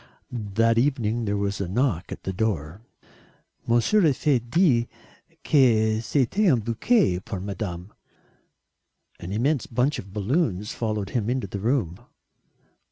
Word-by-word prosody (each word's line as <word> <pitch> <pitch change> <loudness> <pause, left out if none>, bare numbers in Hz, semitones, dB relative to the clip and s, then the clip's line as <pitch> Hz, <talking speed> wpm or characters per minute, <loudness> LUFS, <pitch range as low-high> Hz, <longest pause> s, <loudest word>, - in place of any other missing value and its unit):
That 115 0 +1
evening 120 -4 0
there 100 0 -1
was 100 0 -2
a 95 - -2
knock 100 -2 -1
at - - -7
the 95 - -3
door. 95 -4 -2 0.9
"Monsieur 120 - +3
a 145 - +3
fait 140 -2 +2
dire 130 -8 +3 0.6
que 110 -6 +3
c'était 150 - +2
un 130 - +3
bouquet 115 - +1
pour 100 0 -6
Madame." 95 -1 -6 1.3
An 85 - -7
immense 130 +6 0
bunch 130 +6 0
of 100 - -10
balloons 105 - -1
followed 105 -4 -3
him 115 -3 -1
into 125 -3 -1
the 100 +1 -6
room. 105 - -1
110 Hz, 135 wpm, -25 LUFS, 100-130 Hz, 1.3 s, Monsieur